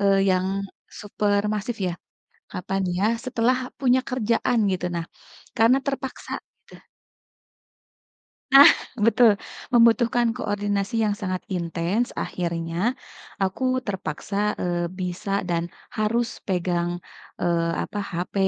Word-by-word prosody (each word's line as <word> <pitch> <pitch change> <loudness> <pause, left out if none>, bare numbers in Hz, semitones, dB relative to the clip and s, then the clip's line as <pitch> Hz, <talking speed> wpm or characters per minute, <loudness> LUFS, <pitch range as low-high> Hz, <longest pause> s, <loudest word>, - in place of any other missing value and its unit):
eee, 195 -1 +4
yang 185 0 +2 0.5
super 205 0 +1
massive 215 +2 -3
ya. - - -2 0.6
Kapan 195 +2 -2 0.2
ya, 200 - +1 0.2
setelah 250 0 +2 0.2
punya 260 -1 +4
kerjaan 240 -1 +1
gitu, 180 -1 -2
nah, 170 -1 -2 0.5
karena 230 +4 +5
terpaksa, 270 -1 -4 0.4
gitu. - - -15 1.8
Nah, 275 +1 +11 0.4
betul, 230 -2 +5 0.3
membutuhkan 235 -1 +4
koordinasi 205 -2 -2
yang 210 - +1
sangat 185 -2 -3
intens, 175 +6 -1
akhirnya 170 +6 -2 0.5
aku 195 +7 -1 0.2
terpaksa, 190 0 -4 0.2
eee, 175 -1 -1
bisa 180 +3 -4
dan 170 -1 -1 0.2
harus 230 +2 -1
pegang, 175 -2 0 0.5
eee, 170 -1 +1
apa, 205 - -6
HP 180 -3 -4
205 Hz, 105 wpm, -24 LUFS, 180-235 Hz, 1.8 s, Nah